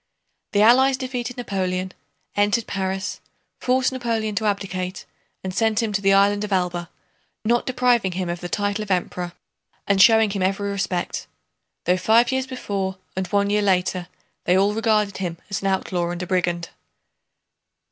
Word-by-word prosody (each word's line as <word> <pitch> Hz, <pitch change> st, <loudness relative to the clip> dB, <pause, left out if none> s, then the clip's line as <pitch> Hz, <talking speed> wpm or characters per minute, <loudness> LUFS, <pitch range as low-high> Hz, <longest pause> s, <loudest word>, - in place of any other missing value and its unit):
The 205 Hz, 0 st, +4 dB
Allies 260 Hz, +4 st, +6 dB
defeated 250 Hz, -1 st, -4 dB
Napoleon, 185 Hz, -5 st, -2 dB, 0.4 s
entered 205 Hz, +3 st, +2 dB
Paris, 190 Hz, 0 st, -3 dB, 0.4 s
forced 255 Hz, +1 st, +2 dB
Napoleon 230 Hz, -4 st, -1 dB
to 210 Hz, +2 st, 0 dB
abdicate, 185 Hz, -2 st, -3 dB, 0.4 s
and 190 Hz, -1 st, -4 dB
sent 220 Hz, +2 st, +2 dB
him 215 Hz, -2 st, -2 dB
to 200 Hz, -, 0 dB
the 195 Hz, 0 st, +4 dB
island 200 Hz, +1 st, +4 dB
of 210 Hz, -, -5 dB
Elba, 175 Hz, -2 st, -1 dB, 0.6 s
not 235 Hz, +2 st, +2 dB
depriving 245 Hz, -6 st, +2 dB
him 185 Hz, 0 st, -2 dB
of 175 Hz, 0 st, -3 dB
the 175 Hz, -, -6 dB
title 205 Hz, +2 st, -1 dB
of 210 Hz, -, -6 dB
Emperor 180 Hz, -1 st, -1 dB, 0.5 s
and 200 Hz, -1 st, +3 dB
showing 220 Hz, +1 st, +6 dB
him 195 Hz, -1 st, -2 dB
every 195 Hz, +2 st, 0 dB
respect, 195 Hz, -3 st, -2 dB, 0.6 s
though 180 Hz, +1 st, +3 dB
five 230 Hz, +6 st, +4 dB
years 265 Hz, 0 st, -1 dB
before 195 Hz, -7 st, -3 dB, 0.2 s
and 190 Hz, 0 st, -2 dB
one 200 Hz, +2 st, +1 dB
year 210 Hz, 0 st, +3 dB
later 185 Hz, -2 st, +1 dB, 0.4 s
they 180 Hz, +1 st, +4 dB
all 200 Hz, +2 st, +3 dB
regarded 215 Hz, -2 st, +1 dB
him 175 Hz, -3 st, -3 dB
as 195 Hz, -, -2 dB
an 195 Hz, -, -1 dB
outlaw 180 Hz, -2 st, 0 dB
and 175 Hz, +1 st, -4 dB
a -, -, -3 dB
brigand. 175 Hz, -2 st, -1 dB
200 Hz, 165 wpm, -23 LUFS, 185-220 Hz, 0.6 s, Allies